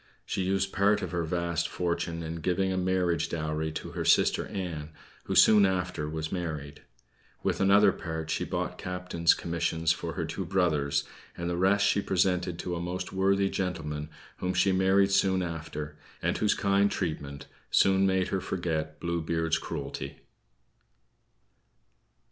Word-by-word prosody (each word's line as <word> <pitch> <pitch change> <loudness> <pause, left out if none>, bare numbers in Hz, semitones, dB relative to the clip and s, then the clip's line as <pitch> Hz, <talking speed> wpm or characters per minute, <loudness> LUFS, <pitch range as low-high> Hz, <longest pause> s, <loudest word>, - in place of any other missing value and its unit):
She 95 - -2
used 95 +1 0
part 100 +2 +3
of - - -4
her 85 -1 -1
vast 85 0 -1
fortune 85 -1 -2
in 80 +1 -4
giving 90 +3 0
a - - -2
marriage 90 -3 +1
dowry 80 -1 -2
to - - -6
her - - -3
sister - - +3
Ann, 85 -6 -5 0.4
who - - -2
soon 105 -2 +7
after 90 -5 0
was 80 0 -4
married. 75 -5 -4 0.6
With - - 0
another 100 +1 +6
part 80 -2 -5
she - - 0
bought - - -3
captains' 90 -2 +1
commissions 85 -1 0
for - - -3
her - - -2
two 95 - -4
brothers; 75 -6 +1 0.3
and 85 - -3
the 85 - -1
rest 95 +3 +3
she 100 - +3
presented 90 -2 +1
to 90 0 -3
a 85 - -3
most 90 +2 -4
worthy 100 +1 +2
gentleman 80 -6 -3 0.3
whom 90 0 -2
she 100 - +3
married 95 +1 +3
soon 95 -1 +3
after, 75 -3 -6 0.2
and - - 0
whose 105 -1 +2
kind 100 0 +3
treatment 70 -6 -4 0.2
soon 95 0 +4
made 95 -1 +1
her 95 - -1
forget 80 -4 -3
Blue 85 -1 -2
Beard's 80 0 0
cruelty. - - -5
90 Hz, 155 wpm, -28 LUFS, 80-95 Hz, 0.6 s, soon